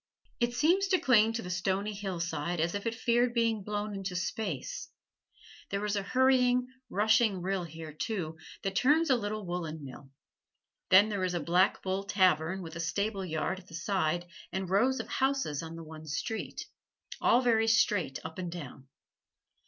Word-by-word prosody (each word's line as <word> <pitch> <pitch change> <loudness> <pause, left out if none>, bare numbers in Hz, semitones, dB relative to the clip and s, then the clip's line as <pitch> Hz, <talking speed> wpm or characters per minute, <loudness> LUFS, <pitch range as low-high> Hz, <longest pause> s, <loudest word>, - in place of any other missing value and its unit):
It 240 0 0
seems 350 +10 +3
to 375 -2 +3
cling 225 -4 +4
to 230 - -3
the 180 - -5
stony 190 +3 -1
hillside 175 -4 -3
as 165 +2 +1
if 205 +2 -3
it 230 - -1
feared 240 +1 +2
being 230 -2 +2
blown 210 +1 -3
into 195 -2 -4
space. 180 - -3 0.8
There 200 +1 -2
is 210 0 0
a 200 - 0
hurrying, 250 +2 +3 0.2
rushing 215 -1 +3
rill 190 -1 -1
here, 160 -1 -9
too, 160 -2 -3 0.2
that 195 0 -2
turns 295 - +4
a - - +6
little 215 -2 -3
woolen 165 -4 -4
mill. 135 +1 -11 0.8
Then 200 +3 +7
there 200 -3 -2
is 180 -1 0
a - - +1
"Black 180 +4 +2
Bull" 190 +1 -1
tavern, 185 -2 +2
with 165 -1 -8
a - - -5
stable 200 +4 -1
yard 175 +2 -2
at 185 - -18
the 165 - -10
side 175 -2 0 0.3
and 190 0 -3
rows 255 +7 +3
of 225 - -4
houses 265 - 0
on 165 0 -7
the 165 - -8
one 155 0 -10
street, 190 +9 -4 0.6
all 245 - +5
very 225 -3 +3
straight 205 - +2
up 160 +3 -7
and 175 -2 -4
down. 140 -5 -8
195 Hz, 175 wpm, -30 LUFS, 170-225 Hz, 0.8 s, Then